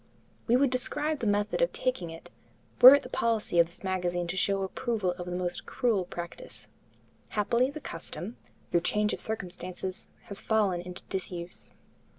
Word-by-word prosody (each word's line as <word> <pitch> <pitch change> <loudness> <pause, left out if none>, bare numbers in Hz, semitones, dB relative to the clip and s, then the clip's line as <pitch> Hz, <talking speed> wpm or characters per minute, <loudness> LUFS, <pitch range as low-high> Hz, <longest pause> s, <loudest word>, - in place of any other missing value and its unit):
We 240 - +4
would 265 0 +3
describe 295 +4 0
the 225 - -1
method 205 - +1
of - - +3
taking 250 -10 -2
it, 165 0 -11 0.5
were 260 +3 +13
it 285 - 0
the - - -7
policy 225 -8 +1
of 170 - +6
this 175 - -15
magazine 180 -2 -1
to 180 - -2
show 195 +1 +1
approval 210 -1 -1
of 175 0 -7
a - - -4
most 180 0 -3
cruel 225 -8 +1
practice. 175 -1 -8 0.6
Happily 235 +5 +2
the 305 +2 -8
custom, 175 - -6 0.4
through 170 - +3
change 210 +3 +1
of - - -4
circumstances, 185 -1 -5 0.2
has 200 - -8
fallen 205 -5 +1
into 180 +1 -8
disuse. 180 -2 -6
195 Hz, 165 wpm, -29 LUFS, 180-235 Hz, 0.6 s, were